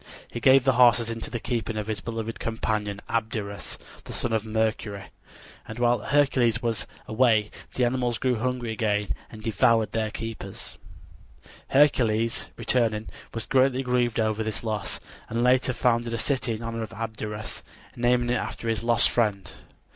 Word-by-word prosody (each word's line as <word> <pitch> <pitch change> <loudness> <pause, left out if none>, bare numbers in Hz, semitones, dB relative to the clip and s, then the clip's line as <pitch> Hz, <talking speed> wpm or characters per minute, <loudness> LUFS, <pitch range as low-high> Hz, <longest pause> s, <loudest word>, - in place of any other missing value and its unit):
He 120 - -6
gave 130 +2 +6
the 135 - +4
horses 115 -1 +5
into 115 0 -5
the 120 - -3
keeping 115 -2 -2
of 105 - -2
his 105 -3 -3
beloved 115 0 -4
companion 105 -3 -2
Abderus, 110 -4 -3 0.3
the - - -7
son 115 - 0
of 110 -1 +1
Mercury, 110 -2 -2 0.6
and 110 - -7
while 120 -1 +3
Hercules 125 -2 +2
was 115 -4 -2 0.2
away 110 -2 +3 0.2
the 125 - +3
animals 120 -1 0
grew 125 -1 +1
hungry 125 -1 -1
again 105 -2 0 0.2
and 110 -1 -11
devoured 115 0 +3
their 110 -1 -1
keeper. 110 -3 -6 1.1
Hercules, 115 -6 +3
returning, 110 -3 0 0.2
was 115 -1 -4
greatly 130 0 +3
grieved 125 -2 +1
over 110 0 +1
this 110 0 -3
loss, 105 -3 -2 0.3
and 115 +2 0
later 130 +1 +4
founded 120 -2 +1
a - - -2
city 125 -1 -1
in 110 - -8
honor 115 0 -3
of 110 -1 -6
Abderus, 110 -1 -5 0.3
naming 120 0 +2
it 125 - +2
after 115 - -4
his 110 -2 0
lost 115 0 +5
friend. 105 -5 0
115 Hz, 160 wpm, -26 LUFS, 110-120 Hz, 1.1 s, gave